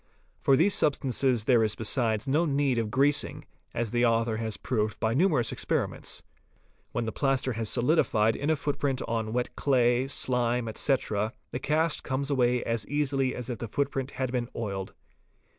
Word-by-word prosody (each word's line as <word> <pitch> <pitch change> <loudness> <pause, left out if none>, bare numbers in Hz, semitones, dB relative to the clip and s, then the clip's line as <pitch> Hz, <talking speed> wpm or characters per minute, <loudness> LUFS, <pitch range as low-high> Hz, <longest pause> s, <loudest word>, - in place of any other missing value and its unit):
For 135 - +4
these 185 +7 +4
substances 130 -5 +1
there 120 -3 +4
is 105 -1 0
besides 110 0 0
no 150 +6 +2
need 140 -4 +1
of 110 -2 -1
greasing, 140 +4 +1 0.3
as 115 -2 -2
the 120 0 +1
author 115 -1 +2
has 110 -2 -3
proved 110 -4 -2
by 110 +1 +1
numerous 150 -4 +2
experi - - 0
ments. - - -6 0.7
When 120 - -2
the 110 - -2
plaster 135 -1 0
has 110 -1 -2
solidified 120 -5 +2
in 145 - -2
a 160 - +4
footprint 140 -2 -2
on 110 -1 -2
wet 125 +1 -2
clay, 125 -2 +2
slime, 125 -3 +1
etc., 110 -2 0 0.2
the 125 - -3
cast 155 +3 0
comes 135 +1 -2
away 125 -2 +2
as 115 -2 -2
easily 135 -2 0
as 125 -2 -5
if 120 -3 -4
the 115 - -4
footprint 135 +2 -2
had 130 -2 -2
been 125 -1 -2
oiled. 100 -4 -4
125 Hz, 175 wpm, -28 LUFS, 115-140 Hz, 0.7 s, For